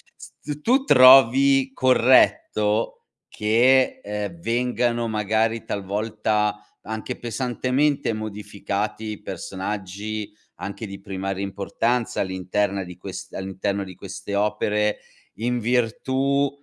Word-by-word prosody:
s 150 -1 -9
tu 260 - +2
trovi 135 - +7
corretto 115 -4 +3 0.2
che, 120 +5 +3
ehm, 105 -4 -5
vengano, 120 +2 0
magari, 110 +1 0
talvolta, 105 +1 -1 0.2
anche 110 +3 -5
pesantemente 130 +3 0
modificati 105 0 -4
i 105 - -8
personaggi 100 +3 -5 0.3
anche 105 +3 -5
di 100 0 -8
primaria 95 0 -4
importanza 115 +5 -1
all'interna 95 +1 -1
di 90 0 -11
quest 95 0 -8
all'interno 95 +1 -3
di 95 -1 -10
queste 100 +1 -8
opere 105 0 0 0.4
in 120 +4 -1
virtù, 130 +4 +1
110 Hz, 95 wpm, -23 LUFS, 100-125 Hz, 0.4 s, trovi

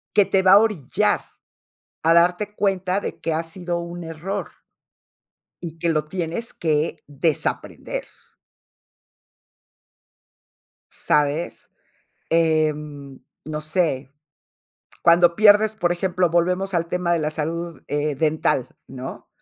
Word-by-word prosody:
que 205 - +6
te 195 0 +1
va 185 0 +6
a 200 - +10
orillar 205 - +1 0.8
a 165 +1 +4
darte 180 +5 +3
cuenta 190 -2 0
de - - -5
que 165 - -2
ha 160 +1 0
sido 175 +1 -4
un 170 0 -7
error 165 +5 -5 1.1
y 165 -2 -7
que 170 - -1
lo 155 -2 +1
tienes 175 +7 -3
que 155 -1 0
desaprender. 145 +1 -2 2.9
¿Sabes? 150 +3 -1 0.6
Eh, 160 -2 +3
no 150 +1 -9
sé, 150 -4 -1 0.9
cuando 170 0 +5
pierdes, 215 +1 +5
por 175 -4 +1
ejemplo, 180 0 0
volvemos 180 +3 +1
al 170 -1 +1
tema 175 0 -1
de 170 - +2
la 155 -1 -1
salud, 165 +1 -4
eh, 145 0 -1
dental, 155 -4 +1 0.2
¿no? 130 0 -8
170 Hz, 115 wpm, -22 LUFS, 155-180 Hz, 2.9 s, a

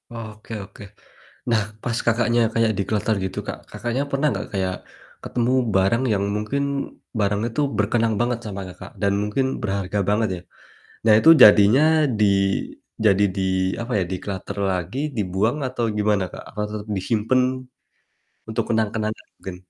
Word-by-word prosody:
Oke 110 -1 -9
oke. 100 - -16 0.7
Nah 110 -2 +3 0.2
pas, 120 -2 -2
Kakaknya, 120 +1 +2
kaya 115 -1 +2
dikloter 105 +2 0
gitu, 95 - -4
Kak, - - -3
Kakaknya, 120 +3 -2
pernah 140 +2 +1
gak - - -5
kayak 95 -2 -1 0.5
ketemu 120 +1 -1 0.2
barang 100 +6 +3
yang 100 -1 +1
mungkin 110 +7 -2 0.6
barang 105 0 +1
itu 120 +6 -3 0.2
berkenang 110 +1 +1
banget 120 0 +1
sama, 100 -2 -5
Kakak, 90 - -11
dan 100 - +3
mungkin 105 +6 0 0.2
berharga 100 -1 -2
banget 105 +2 +2
ya. 85 - -8 0.7
Nah 110 - +6
itu 160 - +5
jadinya 105 +6 +7 0.4
di 105 - +5 0.8
jadi 100 -1 +4
di 95 - -1 0.4
apa 120 - -6
ya, - - +1
declutter 95 +1 -5
lagi 90 +6 -3 0.2
dibuang 100 +6 0
atau 125 -2 -3
gimana, 105 -2 +2
Kak? - - -9
Atau 105 -1 -4
tetep 105 0 -6
disimpen 110 +6 +1 1.1
untuk 110 0 -1
kenang-kenangan 110 -1 -1
mungkin? 95 -2 -8
105 Hz, 145 wpm, -22 LUFS, 100-115 Hz, 1.1 s, jadinya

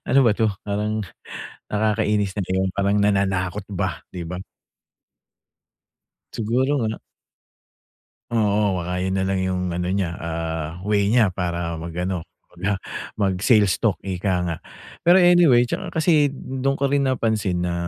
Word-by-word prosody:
ano 130 - +4
ba 110 - +5
'to? 110 +1 +1 0.2
Parang 105 +1 -1 0.7
nakakainis 105 -2 +1
na 100 - -1 0.2
yung 95 0 0
parang 100 +1 +1
nananakot 100 -1 +1
ba, 95 -1 -2
'di 90 -2 -6
ba? 90 +2 -5 1.9
Siguro 125 +6 +1
nga. 110 0 -1 1.3
Oo, 105 -4 +2
baka 90 +1 -2
yun 95 0 -1
na 95 - 0
lang 95 0 0
yung 90 -1 -1
ano 90 0 -2
niya, 95 -3 -1
ah, 80 -1 -3 0.2
way 100 -1 +2
niya 115 -2 +5
para 85 -2 -2
mag-ano 85 +2 -3 0.3
mag, 90 - -16 0.2
ah, - - -21 0.4
mag 95 -2 +2
sales 105 -7 +4
talk, - - +2
ika 95 0 -2
nga. 85 -2 -2 0.5
Pero 175 +2 +6
anyway, 175 -9 +6
tsaka - - -4
kasi 150 -4 +4
dun 135 0 -2
ko 140 - +2
rin 140 0 +2
napansin 110 -9 0
na 85 - -1
100 Hz, 145 wpm, -22 LUFS, 90-110 Hz, 1.9 s, Pero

